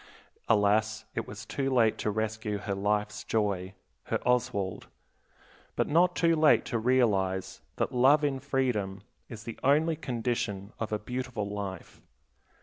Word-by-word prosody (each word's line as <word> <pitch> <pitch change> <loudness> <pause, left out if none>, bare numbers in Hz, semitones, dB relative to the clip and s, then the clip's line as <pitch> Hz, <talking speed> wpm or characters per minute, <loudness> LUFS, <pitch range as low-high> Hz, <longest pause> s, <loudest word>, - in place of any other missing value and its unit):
Alas, 110 +1 +2
it - - -3
was 105 +2 -8
too 135 +4 -2
late 115 -4 +3
to - - 0
rescue 110 0 -2
her 100 0 -3
life's 105 +1 -1
joy, 100 -3 -1 0.3
her - - 0
Oswald; 110 -6 0 0.9
but - - +1
not 175 +4 +3
too 165 -1 +3
late 155 -1 +4
to 115 - -1
realize 105 -6 +1
that - - -1
love 135 +5 +5
in 140 -2 0
freedom 120 -9 -1 0.3
is 110 -3 -8
the 115 -1 -7
only 155 +4 +3
condition 115 -7 -3
of 110 - -3
a 105 - +1
beautiful 125 -1 -4
life. 100 -3 -6
110 Hz, 145 wpm, -29 LUFS, 105-130 Hz, 0.9 s, love